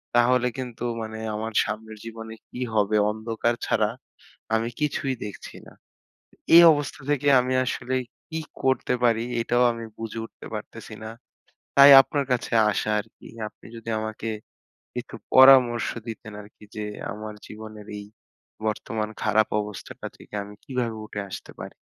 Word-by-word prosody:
তাহলে 125 +1 +4
কিন্তু 125 -3 -6 0.2
মানে 110 0 -6 0.2
আমার 110 +1 -4
সামনের 110 +1 -6
জীবনে 110 0 -8 0.2
কি 125 - -9 0.2
হবে 105 0 +3
অন্ধকার 115 +2 -1
ছাড়া 105 -1 +2 0.7
আমি 110 +1 +1
কিছুই 135 -2 0
দেখছি 105 - -8
না। - - -13 0.8
এই 170 - +11
অবস্থা 145 -2 -3
থেকে 145 0 +1
আমি 125 +1 -1
আসলে 130 0 -2 0.4
কি 160 - -3 0.2
করতে 130 -1 +2
পারি 115 -1 +3 0.2
এটাও 120 +1 +2
আমি 115 0 -7
বুঝে 115 0 -5
উঠতে - - -12
পারতেছি - - -8
না। 110 - -5 0.7
তাই 140 0 +10
আপনার 140 +1 -2
কাছে 125 - 0 0.2
আসা 105 - -1
আর 105 - -5
কি। - - -14 0.2
আপনি - - -17
যদি 115 0 -8
আমাকে 110 +1 -4 0.7
কিছু 125 -2 -6 0.2
পরামর্শ 130 -3 +7 0.2
দিতেন 110 -1 -7
আরকি 105 +1 -17
যে 105 - -3 0.3
আমার 105 0 -7
জীবনের 110 -1 -10
এই 100 - -8 0.6
বর্তমান 110 0 -2
খারাপ 110 0 +3
অবস্থাটা 105 -2 -8
থেকে - - -15
আমি 100 +1 -10
কিভাবে 125 -5 -2
উঠে 105 - -5
আসতে - - -8
পারি? - - -7
115 Hz, 150 wpm, -25 LUFS, 110-125 Hz, 0.8 s, এই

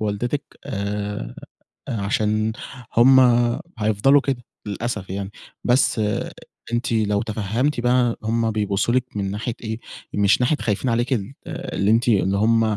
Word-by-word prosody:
ووالدتِك 110 +7 -1 0.2
آآ 100 - -4 0.5
أ - - -3
عشان 110 +1 +1 0.5
هُم 130 +3 +7 0.6
هيفضلوا 110 +6 +4
كده. 135 -3 -2 0.2
للأسف 105 -1 -4
يعني، 100 +1 -4 0.3
بس 120 -2 +3 0.7
أنتِ 120 +1 0
لو 105 -2 +1
تفهمتي 115 +6 -1
بقى 120 -1 +2
هُم 115 0 +1
بيبصوا 105 +1 0
لِك 130 0 +2
من 100 -1 -1
ناحية 110 +3 -3
إيه، 110 0 -4 0.3
مش 100 +3 +3
ناحية 125 +5 +3
خايفين 110 +4 0
عليكِ 120 +2 +1 0.3
اللي 100 +2 -1
أنتِ 115 +2 +3
اللي 100 -3 +3
هُم 115 +2 +3
110 Hz, 130 wpm, -22 LUFS, 105-120 Hz, 0.7 s, هُم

